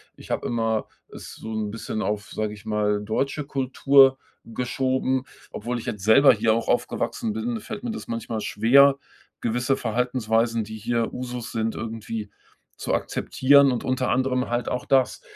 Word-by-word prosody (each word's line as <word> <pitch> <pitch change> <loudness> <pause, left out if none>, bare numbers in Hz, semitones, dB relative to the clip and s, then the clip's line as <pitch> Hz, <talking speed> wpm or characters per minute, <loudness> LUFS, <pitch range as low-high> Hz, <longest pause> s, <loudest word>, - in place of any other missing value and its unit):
Ich - - -14
habe - - -2
immer 115 -2 -1 0.2
es - - -10
so 110 - -8
'n 110 -1 -2
bisschen 110 0 -4
auf, 105 -1 -3
sage 110 -1 -3
ich 105 +1 -13
mal, 105 -1 0
deutsche 135 +7 -2
Kultur 135 0 +4 0.3
geschoben. 130 +2 -1 0.3
Obwohl 120 +3 -4
ich - - -9
jetzt 105 -4 -5
selber 110 +7 +7
hier 110 0 +2
auch 115 +1 -2
aufgewachsen 110 - -1
bin, 115 +2 -3
fällt 210 - -8
mir 240 - -2
das 225 - -7
manchmal 115 -1 -4
schwer, 135 +7 +5 0.4
gewisse 125 +3 0
Verhaltensweisen, 115 -1 0
die 110 +1 -8
hier 115 +1 -1
Usus 125 -2 -5
sind, 110 0 -1
irgendwie 110 -1 -5 0.5
zu - - -3
akzeptieren 140 +1 +3
und 120 - -3
unter 130 0 0
anderem 130 0 0
halt 120 +1 -1
auch 125 - -3
das. 130 -2 +2
115 Hz, 165 wpm, -24 LUFS, 110-130 Hz, 0.5 s, selber